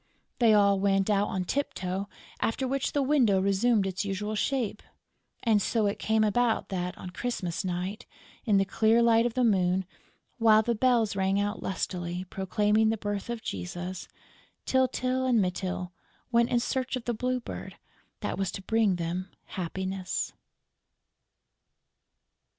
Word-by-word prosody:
They 225 -3 +6
all 200 -1 +4
went 195 +1 +2
out 205 0 +2
on 185 -3 -2
tip 285 +9 -1
toe, 190 +2 -3 0.3
after 260 +4 -1
which 275 +1 -1
the 285 - +2
window 255 -9 +3
resumed 200 +2 +2
its 190 -1 -2
usual 205 +2 -3
shape. 225 -1 -1 0.6
And 220 -4 +3
so 220 +1 +1
it 200 - -1
came 220 0 +2
about 225 +2 +1
that, 180 -2 -3
on 180 - -8
Christmas 180 -4 -3
Night, 185 +3 -4 0.4
in 210 -4 +3
the 195 - +3
clear 225 +3 +3
light 230 0 +4
of 235 - -6
the 255 - +2
moon, 190 -4 +2 0.5
while 220 -1 +6
the 235 - +1
bells 230 -2 +2
rang 195 0 +1
out 205 +1 -2
lustily, 180 -1 -3
proclaiming 210 +3 +2
the 225 - 0
birth 205 0 -4
of 235 -2 -4
Jesus, 175 - -5 0.6
Tyltyl 260 0 +1
and 240 -3 +4
Mytyl 180 -1 -2 0.4
went 235 0 +3
in 240 - +2
search 260 +2 -1
of 255 - -6
the 240 - 0
Blue 250 +3 -1
Bird 235 - -8 0.5
that - - -3
was 195 -2 0
to 195 - -6
bring 220 -2 +2
them 175 +2 -3 0.2
happiness. 190 +1 -3
205 Hz, 155 wpm, -28 LUFS, 190-235 Hz, 0.6 s, They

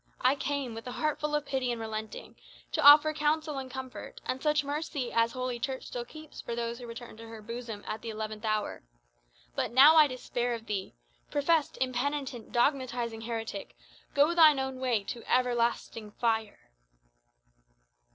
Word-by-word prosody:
I 255 +1 +5
came, 280 -3 -2
with 225 +2 -8
a 250 - -5
heart 305 -1 -1
full 300 0 -1
of 295 -1 -1
pity 260 -3 -1
and 235 - -3
relenting, 220 -1 -6 0.4
to - - 0
offer 300 +2 +9
counsel 300 -1 0
and 260 -1 -7
comfort, 260 -1 -8
and 260 +1 -2
such 300 -1 +2
mercy 285 -3 -3
as 230 0 +2
Holy 255 -1 -3
Church 260 +2 -3
still 240 -1 -5
keeps 310 +3 -11
for 235 - -4
those 235 0 -3
who 245 - -8
return 230 -1 -9
to 230 0 -10
her 225 -1 -9
bosom 230 -1 -7
at 215 - -4
the 230 - -6
eleventh 215 0 -5
hour. 215 -1 -1 0.7
But - - -1
now, 285 +6 +8
I 305 -1 +8
despair 245 -2 -2
of 225 -1 -9
thee. 200 - -4 0.3
Professed, 295 +1 +1
impenitent, 260 -1 -2
dogmatizing 240 -3 0
heretic, 225 -3 -5 0.4
go 290 +4 +5
thine 315 -4 +7
own 265 -1 -3
way 245 -5 +1
to 235 +4 -6
everlasting 240 -3 +1
fire!" 220 - -2
250 Hz, 170 wpm, -30 LUFS, 230-285 Hz, 0.7 s, offer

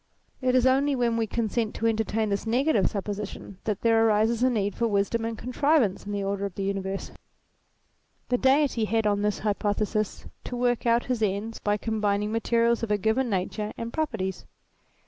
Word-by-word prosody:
It 255 0 +2
is 255 -1 +4
only 275 +2 +3
when 240 -2 +1
we 225 -1 0
consent 225 0 -1
to 230 - -3
entertain 220 -1 0
this 200 +2 -2
negative 240 - +2
supposition 200 -1 -5
that 210 -3 -2
there 225 -1 +4
arises 220 +1 +2
a 255 - +4
need 205 -4 0
for 235 - 0
wisdom 210 +2 0
and 230 -1 -3
contrivance 250 -6 +1
in - - -4
the 200 -1 -2
order 200 0 -2
of 195 - -12
the 195 - -3
universe. 195 0 -3 1.2
The 245 0 +1
Deity 265 -4 +3
had 225 0 0
on 205 -1 +2
this 210 0 0
hypothesis 210 0 -1 0.2
to 245 - -4
work 245 -1 +1
out 235 +1 +3
his 250 -3 -2
ends 210 +2 -1
by 205 0 0
combining 210 -1 -1
materials 235 +1 +2
of 230 - -3
a 210 - +2
given 220 +5 +1
nature 210 +2 -2
and 230 0 -5
properties. 190 - -3
220 Hz, 185 wpm, -26 LUFS, 205-235 Hz, 1.2 s, is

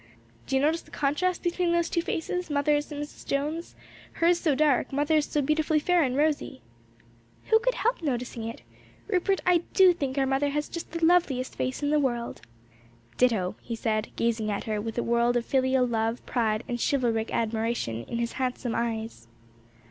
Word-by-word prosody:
"Do - - -1
you 265 - +3
notice 320 +3 +2
the - - -20
contrast 300 +6 0
between 345 0 +1
those 340 -1 +2
two 340 - 0
faces? 350 +2 -3
mother's 290 +1 +1
and 290 - -5
Mrs. 295 - -11
Jones'; 300 +5 -3 0.4
hers 340 +1 +3
so 310 -6 +1
dark, 295 -2 +2
mother's 295 +2 +2
so 295 - 0
beautifully 305 +2 +1
fair 350 +3 +3
and 260 -3 0
rosy." 295 -2 0 0.9
"Who 445 - +7
could - - 0
help 475 -1 0
noticing 245 -6 -3
it? 230 - -8 0.4
Rupert, 390 -1 +1
I 360 -1 +5
do 375 -2 +7
think 280 -5 -3
our 270 - +3
mother 270 +2 +1
has 295 +1 -2
just 335 - -6
the 335 0 0
loveliest 310 -7 +2
face 255 +3 -3
in 290 - +1
the 300 - +4
world!" 240 - -2 0.8
"Ditto!" 215 -6 +2
he 235 - -5
said, 215 -1 -1
gazing 225 -2 0
at 205 - -2
her 215 -1 -2
with 225 +2 -5
a 240 - +1
world 235 +1 +2
of 235 - -2
filial 260 -1 +2
love, 225 0 -1
pride 225 -2 0
and 240 -2 -3
chivalric 230 -5 0
admiration 220 - -1
in 235 - -4
his 235 0 -1
handsome 250 -2 -2
eyes. 225 - -3
270 Hz, 185 wpm, -27 LUFS, 235-315 Hz, 0.9 s, Who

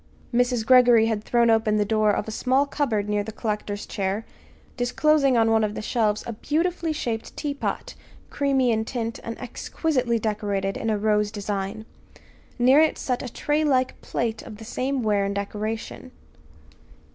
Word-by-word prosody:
Mrs. 245 -2 +1
Greggory 245 -2 +6
had 220 -2 -1
thrown 235 0 +3
open 220 -1 +2
the 210 - +2
door 215 0 +2
of 205 - 0
a - - -4
small 260 +5 +2
cupboard 240 -8 -1
near 210 0 0
the 220 - -6
collector's 210 -2 -3
chair, 200 +3 -2 0.5
disclosing 275 +2 +2
on 225 0 +3
one 220 -1 +3
of 210 0 -1
the - - -4
shelves 215 -3 0
a 235 - -4
beautifully 330 +7 -1
shaped 235 -7 -4
teapot, 285 -2 -3 0.4
creamy 270 -3 +2
in 220 -1 +1
tint, 230 0 -4
and 230 - -5
exquisitely 250 -1 -1
decorated 205 -3 -2
in 225 - -2
a 215 - +1
rose 210 0 +1
design. 205 0 -4 0.7
Near 260 +4 +5
it 315 0 +3
set 250 -2 -2
a 250 - -6
tray 295 +4 0
like 260 -4 +1
plate 225 -2 -2
of 215 - -10
the 225 - -10
same 260 +3 -2
ware 205 -2 +2
and 200 0 -2
decoration. 215 +5 -4
225 Hz, 170 wpm, -24 LUFS, 210-255 Hz, 0.7 s, Greggory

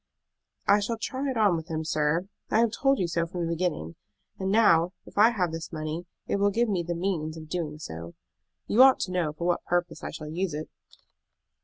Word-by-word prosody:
"I 205 - +6
shall 225 +3 -2
try 260 +4 -3
it 260 - -2
on 205 -5 +4
with 160 0 -5
him, 160 -1 -3
sir. 155 +3 +1 0.2
I - - +2
have 230 -1 +3
told 275 +3 +2
you 185 - 0
so 170 0 -1
from 175 -1 -3
the 165 - -1
beginning; 160 - -2 0.5
and 190 0 -1
now 180 -5 +4
if - - -15
I 215 +3 +7
have 185 -8 0
this 165 0 -6
money 155 +2 -4 0.2
it - - 0
will 200 0 +3
give 235 +4 +1
me 190 -4 +1
the 175 0 -3
means 165 -3 -2
of 155 -1 -9
doing 160 -4 -3
so. 85 - -8 0.5
You 235 - +4
ought 265 0 +8
to 185 - -2
know 175 -4 0
for 170 +3 -5
what 175 0 +1
purpose 175 0 -1
I - - -3
shall 155 -1 -7
use 175 -1 -2
it." 155 +1 -5
175 Hz, 220 wpm, -27 LUFS, 160-200 Hz, 0.5 s, ought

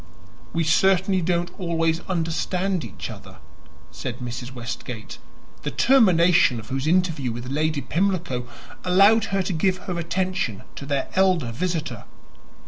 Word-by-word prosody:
"We 165 +1 0
certainly 190 +3 +3
don't 175 +1 0
always 165 -2 0
understand 180 +1 -1
each 110 - -7
other," - - -12 0.5
said 125 -2 -5
Mrs. 120 0 -6
Westgate, 120 -2 -7 0.4
the - - -3
termination 180 - +4
of 110 - -11
whose 135 +2 -2
interview 165 -7 +1
with 120 +2 -6
Lady 155 0 0
Pimlico 165 -5 -1 0.4
allowed 200 +5 +5
her 195 -2 0
to 185 - -2
give 185 +3 +1
her 180 -2 -3
attention 180 - -2
to 140 - -7
their 140 -2 -1
elder 185 -10 +3
visitor. 155 - -3
165 Hz, 135 wpm, -24 LUFS, 130-185 Hz, 0.5 s, allowed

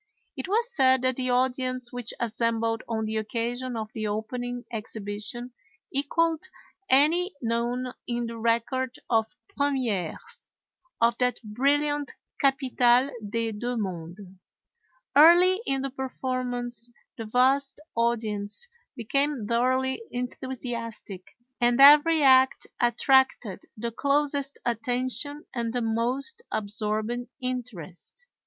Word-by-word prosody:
It - - -5
was 465 +5 +1
said 260 -1 +4
that 255 0 +2
the 255 0 -2
audience 255 0 0
which 245 -2 -3
assembled 230 0 0
on 220 -1 -1
the 220 0 -2
occasion 235 +3 -3
of 215 -1 -4
the 215 -1 -3
opening 245 +3 -4
exhibition 215 +2 -5 0.4
equaled 320 +3 +1 0.5
any 315 +8 +3
known 240 +1 -1
in 240 0 -1
the 230 0 -6
record 235 +3 0
of 225 -1 +3 0.3
premières 270 - -2 0.5
of 235 0 +2
that 250 -1 +1
brilliant 285 +6 0 0.3
capitale 265 -2 +3
des 225 +2 -2
deux 240 +3 -3
mondes. 180 -2 -5 0.9
Early 350 +6 +7
in 270 0 0
the 275 - -3
performance 250 -3 -4 0.3
the 225 - -4
vast 265 +5 +2
audience 225 - -1 0.3
became 275 +1 -1
thoroughly 260 - +1
enthusiastic, 245 -6 -5 0.3
and 240 +1 +3
every 300 +3 +8
act 260 -1 +5
attracted 240 -4 +2 0.2
the 235 +2 -3
closest 280 +2 0
attention 250 +5 -1
and 235 -2 -2
the 245 +1 -1
most 245 - +1
absorbing 215 +3 -2
interest. 250 - -6
245 Hz, 110 wpm, -26 LUFS, 230-270 Hz, 0.9 s, every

